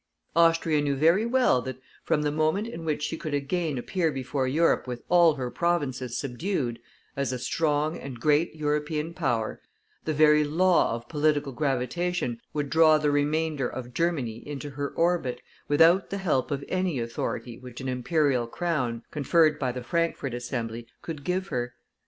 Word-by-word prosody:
Austria 165 -2 +4
knew 145 -1 0
very 170 +10 +3
well 250 - +3
that 130 +2 -6 0.3
from 150 - +1
the 145 - +1
moment 155 +8 +1
in 170 -8 -7
which 150 -1 -1
she 155 - -2
could 155 -3 -3
again 145 +1 -1
appear 165 +6 0
before 135 0 -2
Europe 155 +1 +2
with 120 -1 -5
all 170 -3 +6
her 125 -3 -4
provinces 130 -8 -1
subdued, 130 - -2 0.4
as 140 -2 -1
a 130 - -2
strong 150 +4 0
and 130 -3 -8
great 150 +5 +2
European 150 +1 -1
power, 120 -10 -1 0.4
the 155 - 0
very 150 0 +5
law 170 -3 +3
of 115 0 -8
political 150 -2 +1
gravitation 135 0 -1
would 145 -1 -2
draw 160 -1 +6
the 150 -1 +1
remainder 150 -1 +1
of 125 -1 -7
Germany 140 -9 -1
into 145 0 -6
her 140 +1 -3
orbit, 165 -8 0 0.3
without 165 +6 +5
the 200 - -3
help 160 -9 0
of 140 -1 -3
any 185 -7 -1
authority 115 0 -4
which 125 -2 -10
an 130 - -5
Imperial 130 -1 +1
crown, 125 -6 -2
conferred 155 +1 +3
by 130 -3 0
the 125 0 -6
Frankfort 165 -2 -1
Assembly, 120 -1 -4 0.2
could 155 -4 -6
give 185 +3 -1
her. 120 0 -3
150 Hz, 165 wpm, -27 LUFS, 130-165 Hz, 0.4 s, all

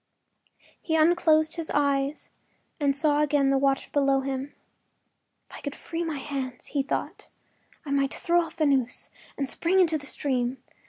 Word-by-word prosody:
He 320 - -1
unclosed 315 0 +3
his 330 -1 -3
eyes 280 0 0 0.5
and 280 -2 +2
saw 295 0 +2
again 285 -2 +2
the 275 - +3
water 275 0 +1
below 275 -2 +2
him. 270 +1 -4 0.9
“If - - -13
I - - -11
could 285 -1 -5
free 335 0 -4
my 320 -3 -3
hands,” 265 -3 -5
he 285 - +2
thought, 275 - -4 0.6
“I 280 - -5
might 275 -1 +1
throw 345 0 +2
off 330 - -7
the 315 - +1
noose 265 -4 +2 0.3
and 275 - -1
spring 350 +7 +1
into 325 -4 +3
the 285 - -6
stream. 255 -2 -1
285 Hz, 165 wpm, -26 LUFS, 275-315 Hz, 0.9 s, unclosed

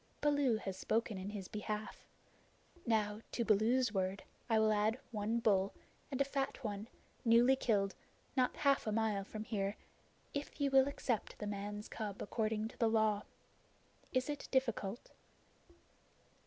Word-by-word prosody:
Baloo 285 -6 +3
has 195 -3 -4
spoken 220 -1 0
in 190 +2 -4
his 200 -3 -5
behalf. 210 0 -5 0.8
Now 215 -1 +1
to 235 - 0
Baloo's 225 +3 +3
word 190 0 -1 0.3
I 225 - +4
will 220 0 +4
add 215 +3 +2
one 215 +1 0
bull, 200 -4 +2 0.3
and 270 -2 -3
a 275 - +4
fat 275 -1 -2
one, 210 -1 -3 0.4
newly 235 +3 +6
killed, 200 -6 +1 0.4
not 255 -1 +2
half 275 -4 +2
a - - +1
mile 215 -2 +1
from 215 +2 -6
here, 200 -2 -1 0.6
if 285 +2 -4
ye 285 -1 +2
will 270 0 +6
accept 250 -5 -2
the 210 - -5
man's 205 +1 -4
cub 205 -3 -5
according 215 0 -1
to - - -15
the 230 - +4
Law. 215 -2 +2 0.9
Is 255 -1 +1
it 295 -1 -4
difficult?" 235 -5 -1
220 Hz, 150 wpm, -36 LUFS, 205-250 Hz, 0.9 s, newly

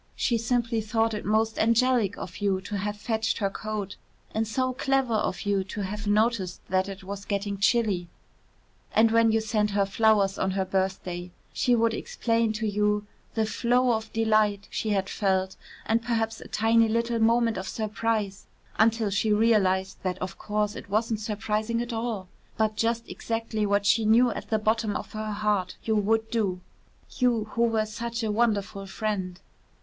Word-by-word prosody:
She 235 -2 +1
simply 230 -1 0
thought 225 +1 0
it 210 - -4
most 220 +1 +1
angelic 230 -2 +3
of 180 - -7
you 200 -2 +1
to 205 - -6
have 210 +1 -3
fetched 220 +1 -1
her 200 -2 0
coat 210 -2 -5 0.4
and 220 0 0
so 255 +3 0
clever 270 -2 +1
of 210 -3 -1
you 200 -2 +1
to 205 +2 -5
have 205 +2 -4
noticed 210 -3 +1
that 190 +1 +1
it 195 -1 -8
was 200 +1 -6
getting 200 -1 -2
chilly. 200 -4 +2 0.9
And 225 0 +5
when 230 0 +4
you 225 - +3
sent 215 -1 0
her 200 -1 +1
flowers 200 -1 +2
on 190 - +1
her 190 - +1
birthday, 185 -2 -2 0.2
she 245 - +2
would 230 -1 +2
explain 230 0 0
to 220 +1 -3
you 210 0 +1 0.3
the 220 -1 +2
flow 245 +3 +2
of 220 -1 -2
delight 215 -2 +2
she 220 - -2
had 195 -2 +1
felt 190 -2 0 0.3
and 225 +1 +2
perhaps 225 -1 -1
a - - -9
tiny 225 +1 +3
little 230 +1 0
moment 230 0 +3
of 190 +1 -4
surprise 215 -2 -2 0.3
until 220 -1 +3
she 210 +2 +1
realised 200 -4 +2
that 185 -1 -2
of 185 -1 -5
course 210 0 -1
it - - -9
wasn't 220 +1 0
surprising 215 +1 -1
at 240 0 -3
all, 225 -4 -3 0.3
but 215 0 +1
just 230 +1 0
exactly 225 -2 -2
what 200 0 +1
she 220 +2 +3
knew 235 +3 +5
at - - -6
the 220 - +2
bottom 215 0 0
of - - -5
her 215 0 -4
heart 205 -3 0
you 220 - +1
would 220 +2 +1
do 200 -6 0 0.6
you, 245 -4 +3
who 235 - -1
were 225 -2 +1
such 230 +2 -4
a 215 - 0
wonderful 205 -3 0
friend. 190 -3 -3
215 Hz, 175 wpm, -27 LUFS, 200-230 Hz, 0.9 s, And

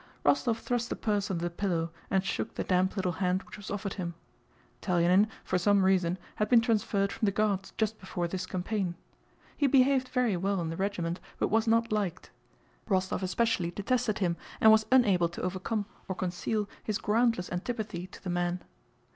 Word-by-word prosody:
Rostóv 235 -3 +3
thrust 240 0 -2
the - - -2
purse 205 -1 -1
under 170 -3 -2
the 175 - -1
pillow 170 -3 -1 0.2
and 190 0 +1
shook - - -3
the - - -2
damp 185 +1 +1
little 185 -3 0
hand 180 +2 0
which - - -11
was 205 - -9
offered 200 -1 -3
him. 170 -3 -4 0.7
Telyánin 180 +3 +4 0.2
for 185 - 0
some 200 +1 +4
reason 185 -2 +2 0.2
had 210 0 0
been 240 - +7
transferred 210 -4 +1
from 215 - -1
the - - +3
Guards 200 -2 0
just 220 0 0
before 180 -2 -3
this 185 +1 -4
campaign. 185 -1 -2 0.6
He 285 - +2
behaved 265 -1 +4
very 250 -6 +1
well 195 +2 0
in 165 -2 -2
the 165 - -4
regiment 180 -3 -2 0.2
but - - 0
was 225 +1 +2
not 230 0 +3
liked; 195 -4 -2 0.6
Rostóv 185 -1 +1
especially 190 -1 +1
detested 215 +3 0
him 175 -4 0 0.2
and 220 - +8
was 220 0 +4
unable 200 -10 +4
to 170 - -7
overcome 190 +4 -2 0.2
or 190 - -3
conceal 190 +4 -2 0.2
his 215 -2 -1
groundless 225 -4 +1
antipathy 185 -1 -3
to - - -14
the 185 - -3
man. 175 0 -1
195 Hz, 185 wpm, -30 LUFS, 180-220 Hz, 0.7 s, and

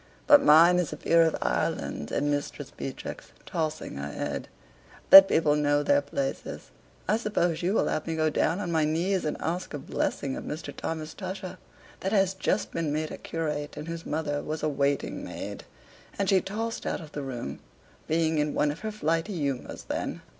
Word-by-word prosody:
"But 290 -1 +8
mine 170 - +7
is 175 - -1
a - - -5
peer 165 0 +4
of 160 -1 +3
Ireland," 75 - -1
says - - -1
Mistress 145 -1 -2
Beatrix, - - -7
tossing 155 - -3
her 70 +1 -4
head. - - -4 0.6
"Let 195 0 +13
people 155 -5 +3
know 145 0 +2
their 145 0 +4
places. 140 -1 -4 0.4
I 210 +4 +3
suppose 175 -7 0
you 185 +4 +1
will - - +2
have 155 - -2
me 165 - -1
go 155 -1 +1
down 165 +4 +1
on 180 -4 -3
my 160 -2 +2
knees 175 +5 0
and 150 - -1
ask 170 -1 -3
a - - -2
blessing 135 0 -2
of - - -6
Mr. 155 +2 -6
Thomas 160 -1 -4
Tusher, 185 -1 -6 0.4
that 190 +3 -2
has 195 -2 +3
just 190 +1 -1
been 165 -3 -1
made 155 +1 -2
a - - -6
curate 150 -3 -4
and 150 +2 -6
whose 165 0 -5
mother 150 -2 -2
was 155 +1 -5
a 155 - +2
waiting 140 -1 -1
maid." - - -7 0.5
And 200 - 0
she 190 -1 +4
tossed 225 +3 -4
out - - -1
of 155 -4 -11
the 145 - -5
room, 120 - -5 0.5
being 160 -1 +1
in 150 0 0
one 150 0 +2
of 150 - -8
her 215 0 -4
flighty 165 -1 -1
humors 140 -4 -3
then. - - -4
160 Hz, 195 wpm, -27 LUFS, 145-180 Hz, 0.6 s, Let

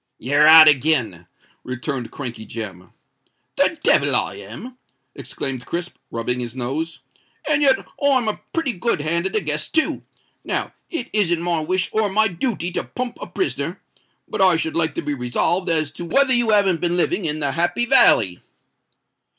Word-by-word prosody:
"You're 145 +5 +2
out 160 0 +10
again," 130 - +1 0.4
returned 130 0 -5
Crankey 120 -5 -6
Jem. 95 -6 -7 0.6
"The - - +1
devil - - +4
I - - 0
am!" 235 - -10 0.3
exclaimed 130 -3 -5
Crisp, 175 +1 -4
rubbing 125 +2 -2
his 120 0 -5
nose. 140 +7 -4 0.5
"And 300 -1 +2
yet 270 -2 +3 0.2
I'm 265 -5 +3
a 215 - -3
pretty 325 -7 -1
good 185 -3 -1
hand 170 +4 0
at 190 - -7
a 215 - +1
guess 150 -2 -2
too. 315 - 0 0.4
Now - - -3 0.2
it 300 -8 -5
isn't 175 -5 +1
my 175 -2 0
wish 180 +4 -1
or 215 -1 +1
my 220 +3 +3
dooty 185 -1 -3
to - - -2
pump 245 -1 -6
a - - -6
prisoner—but 370 - -5
I 185 -2 +5
should 160 0 -2
like 160 -3 +1
to - - -3
be 145 - -2
resolved 140 +8 -1
as 155 -3 0
to 170 +3 -8
whether 265 +7 +3
you 240 -2 +1
haven't 195 -6 +3
been 175 0 0
living 180 +1 0
in 155 -1 -1
the 140 -2 0
Happy 175 - 0
Valley?" 95 - +5
165 Hz, 170 wpm, -21 LUFS, 140-210 Hz, 0.6 s, out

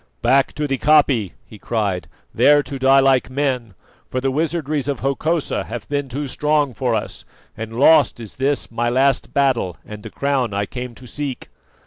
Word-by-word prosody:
"Back 135 +3 +3
to 150 - -2
the 135 -3 -2
koppie," 140 - +3
he 105 - -14
cried, 100 -6 -2 0.3
"there 145 0 +5
to 135 +1 -7
die 135 +1 +5
like 135 -2 +3
men, 130 -6 -2 0.3
for 130 - -2
the 135 +1 -1
wizardries 155 -1 -1
of 140 -3 -2
Hokosa 155 +4 -1
have 115 -2 -7
been 145 -1 -2
too 140 +4 -4
strong 145 0 0
for 120 -1 -1
us, - - -5 0.3
and 115 +1 -6
lost 145 -3 +5
is 110 -3 -10
this 135 0 -1
my 120 +1 -1
last 135 +2 +1
battle 130 -11 +1
and 105 -1 -9
the - - -8
crown 135 -7 -1
I 100 0 0
came 125 +2 -7
to 130 - -13
seek!" 140 0 -6
135 Hz, 180 wpm, -20 LUFS, 120-145 Hz, 0.3 s, there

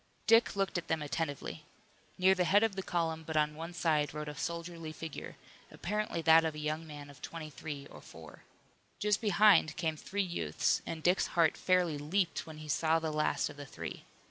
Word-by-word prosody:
Dick 230 -1 +5
looked 195 -2 0
at 175 - -11
them 160 -2 0
attentively. 150 0 -3 0.5
Near 190 0 +5
the 185 -1 +1
head 200 +5 +4
of 220 -3 +1
the 195 - -2
column 165 -3 -1
but 160 0 -3
on 150 0 +2
one 165 +3 -6
side 155 -4 0
rode 150 0 -4
a - - -6
soldierly 170 +1 -5
figure, 155 -1 -7 0.3
apparently 210 -3 -3
that 160 +1 +7
of 160 -1 -1
a - - -6
young 155 +2 -3
man 145 -1 -9
of 140 - -17
twenty 160 -2 -7
three 145 -2 -7
or - - -12
four. - - -13 0.6
Just 210 +1 +1
behind 205 -6 +5
came 160 -1 0
three 200 +6 -2
youths, 85 - 0
and 160 -1 -5
Dick's 180 +2 +3
heart 165 -2 +5
fairly 180 -5 +2
leaped 170 +5 -1
when 160 -1 -9
he 155 0 -9
saw 160 +2 +2
the 160 -1 -2
last 150 0 +1
of - - -10
the 145 - -7
three. - - -7
160 Hz, 200 wpm, -32 LUFS, 150-180 Hz, 0.6 s, that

